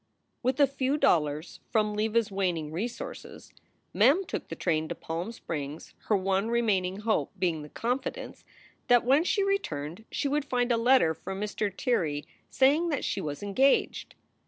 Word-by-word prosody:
With 255 +3 0
a 285 - +8
few 275 +1 -1
dollars 150 - +1
from 215 -2 +1
Leva 215 +2 0
s 225 -3 +1
waning 175 -6 -1
resources 235 - -6 0.4
Mem 280 - +4
took - - -5
the - - -6
train 160 -3 0
to - - -4
Palm 170 +7 -4
Springs, 150 -8 -6
her 210 - +3
one 195 +2 0
remaining 205 -5 +1
hope 220 0 0
being 170 -4 0
the 150 - -10
confidence 250 - -3 0.4
that 245 -1 +5
when 275 +5 +4
she 400 +3 +1
returned 185 - -2
she - - -1
would 290 +1 0
find 245 -2 0
a - - +4
letter 230 -7 +4
from 190 +4 -7
Mr. 210 0 -2
Tirrey 165 - -1 0.2
saying 290 +6 +3
that 290 -4 -1
she 195 - -1
was 150 +1 -5
engaged. 260 +8 +1
215 Hz, 165 wpm, -28 LUFS, 170-260 Hz, 0.4 s, a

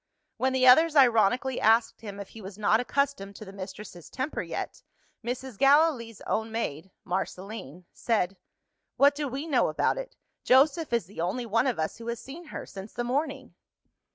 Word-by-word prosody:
When 260 +1 +1
the 260 -1 +3
others 315 +5 +7
ironically 250 0 +4
asked 225 +1 +3
him 205 -3 -8
if 200 - -7
he 225 - -11
was 195 0 -9
not 215 +1 +3
accustomed 250 -6 -1
to 215 - -9
the 195 - -11
mistress's 190 -2 -9
temper 270 +3 -3
yet, - - -5 0.4
Mrs. 245 -1 -5
Gallilee's 275 -6 +3
own 220 +1 -2
maid 190 -6 -3 0.2
(Marceline) 185 -3 -5
said, 195 -5 0 0.6
"What 280 +1 +6
do 290 0 -3
we 270 +4 -4
know 295 -6 +2
about - - 0
it? - - -8 0.3
Joseph 290 +4 +4
is 235 -6 +1
the 185 -1 -7
only 190 +8 -2
one 230 +4 +1
of 250 - 0
us 160 0 -2
who 230 - -10
has 235 -1 -3
seen 325 +6 -10
her, - - -7
since 195 +2 -10
the 240 - -2
morning." 270 - -2
235 Hz, 180 wpm, -28 LUFS, 200-270 Hz, 0.6 s, others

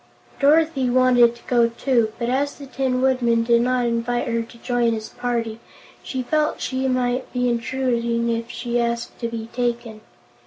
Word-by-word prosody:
Dorothy 295 -2 +3
wanted 245 -1 +4
to 235 - -18
go, 235 -2 +3
too, 235 -2 +1
but 235 - -2
as 275 +3 0
the 280 - -10
Tin 260 -1 -1
Woodman 240 -3 +2
did 235 0 +3
not 250 0 +1
invite 235 +1 -1
her 230 -1 0
to 230 +1 -11
join 240 -1 0
his 220 -1 -5
party, 230 -2 -3 0.4
she 260 -1 -4
felt 305 +4 0
she 260 0 -2
might 255 0 -1
be 250 0 0
intruding 235 -1 0
if 230 0 -3
she 240 0 -2
asked 235 0 -3
to 235 - -2
be 230 -1 -5
taken. 235 -3 -2
245 Hz, 170 wpm, -22 LUFS, 235-255 Hz, 0.4 s, wanted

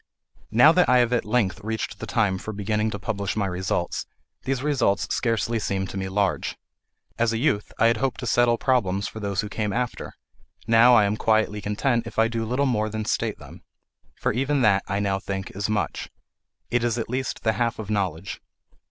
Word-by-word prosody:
Now 120 +8 +7
that 180 -2 +3
I 125 - +6
have 120 0 +3
at 120 - +1
length 105 -3 0
reached 110 -2 -4
the 115 - -6
time 105 -4 +1
for 110 - -6
beginning 105 +1 -1
to 105 - -4
publish 100 0 -3
my 105 -2 0
results, 90 -1 -2 0.4
these 135 0 -1
results 135 -9 +1
scarcely 115 -1 0
seem 95 -2 -1
to 95 - -8
me 95 0 -3
large. 100 -1 -1 0.6
As 115 -1 +2
a 115 - -1
youth, 110 -5 0
I 115 - +3
had 115 0 +4
hoped 135 +1 -1
to - - -4
settle 120 0 +3
problems 100 -7 +1
for 110 - -8
those 100 -2 -1
who 105 - -5
came 105 0 -2
after; 125 +3 -3 0.5
now 115 +2 +6
I 105 -3 +5
am 105 +1 0
quietly 110 -2 +1
content 115 +3 0
if - - -10
I 110 0 +4
do 115 -1 -3
little 125 +5 0
more 110 -5 0
than 110 0 -4
state - - -1
them. - - -13 0.5
For - - -1
even 135 +4 +1
that, 100 -3 +4
I 100 +1 -1
now 100 -1 0
think, 95 -1 -5
is 100 +1 -2
much; 110 -2 -2 0.6
it 120 -1 +1
is 120 -1 0
at 115 - -2
least 130 +2 -3
the 110 - +2
half 120 0 -1
of 110 -1 -6
knowledge. 95 -3 -2
110 Hz, 205 wpm, -24 LUFS, 100-120 Hz, 0.6 s, Now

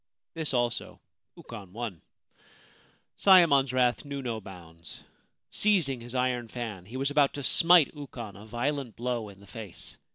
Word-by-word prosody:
This 160 -2 -2
also 120 -1 -1 0.4
Ukon 95 -3 -10
won. 110 -7 -5 1.2
Sayemon's 160 -9 +6
wrath 125 -1 +2
knew 140 -2 -5
no 115 -3 -3
bounds. 85 -4 -11 0.5
Seizing 165 - +2
his 120 +2 -8
iron 125 -2 0
fan, 110 -6 -6
he 120 +5 -7
was 135 +2 0
about 145 -1 +3
to 145 - -5
smite 165 +1 +5
Ukon 125 -8 -8
a 105 +2 -12
violent 125 +2 -2
blow 120 -3 -3
in 100 -1 -14
the 100 - -16
face. 105 -3 -9
120 Hz, 150 wpm, -28 LUFS, 110-140 Hz, 1.2 s, Sayemon's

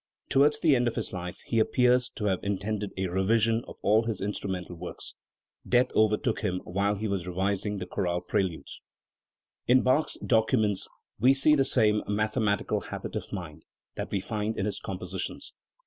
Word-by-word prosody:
Towards 145 +2 +4
the 150 -3 +4
end 120 -1 +2
of 120 - -1
his - - -4
life 90 -1 -5
he 115 - +1
appears 125 +2 +3
to 105 - -3
have 95 -3 +1
intended 100 +1 -2
a 95 - 0
revision 110 +5 +2
of - - -9
all 110 +2 +4
his 115 -3 -2
instrumental 95 -3 -4
works. 90 +1 -7 0.6
Death 125 +1 +3
overtook 110 +2 +2
him 90 -4 -1
while 100 +3 0
he 110 +2 -3
was 95 -3 -2
revising 100 +3 -1
the 90 - -4
chorale 90 -1 -1
preludes. 90 -2 -2 0.9
In 125 +1 +5
Bach's 135 +5 +2
documents 110 -4 +2 0.3
we 130 +2 +5
see 140 +3 +5
the 140 -2 +4
same 110 -5 +3
mathematical 105 0 0
habit - - -7
of - - -3
inind 80 -5 -7 0.3
that - - -5
we 100 - -1
find 105 +2 -3
in 95 - -1
his 105 - -2
compositions. 95 -1 -5
105 Hz, 170 wpm, -28 LUFS, 95-115 Hz, 0.9 s, In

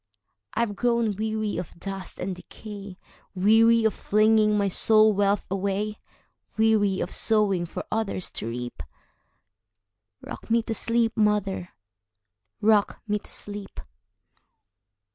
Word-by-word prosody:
I 225 - +1
have 215 -3 -1
grown 235 -2 0
weary 215 0 -2
of 170 - -7
dust 195 0 -7
and 185 +1 -3
decay,—Weary 210 +3 -1
of 220 - +2
flinging 215 0 +2
my 200 -1 +1
soul 215 +3 +4
wealth 200 0 +1
away; 200 +2 -2 0.6
Weary 215 -3 +2
of - - -4
sowing 200 -6 +4
for - - -6
others 215 -4 -2
to - - -4
reap;—Rock 105 - -12
me 230 0 +2
to 225 - -3
sleep, 230 +1 +2
mother,—rock 110 - -2
me 210 0 0
to - - -10
sleep! 205 -1 -5
205 Hz, 110 wpm, -25 LUFS, 175-220 Hz, 0.6 s, soul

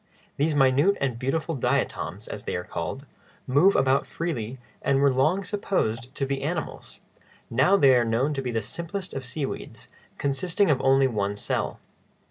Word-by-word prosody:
These 150 +2 +1
minute 140 +8 +4
and 130 -4 -1
beautiful 155 +6 -1
diatoms, 135 - -1
as - - -7
they - - -2
are 90 - -3
called, 110 - -5 0.4
move 145 +10 +4
about 135 +1 +2
freely, 130 -8 -4 0.2
and 135 - +2
were 140 -1 +4
long 155 +10 +2
supposed 130 - -2
to 135 - -1
be 135 0 -2
animals; - - -4 0.5
now 130 +12 +4
they 135 -8 +6
are 120 -1 +4
known 120 +6 +1
to 135 - -2
be 130 - -3
the 115 -3 -1
simplest 170 - -6
of 135 - -4
seaweeds, 135 +2 -5 0.3
consisting 165 +6 +1
of 130 -2 +1
only 135 0 +4
one 100 -5 -1
cell. 105 - -2
135 Hz, 165 wpm, -26 LUFS, 125-160 Hz, 0.5 s, they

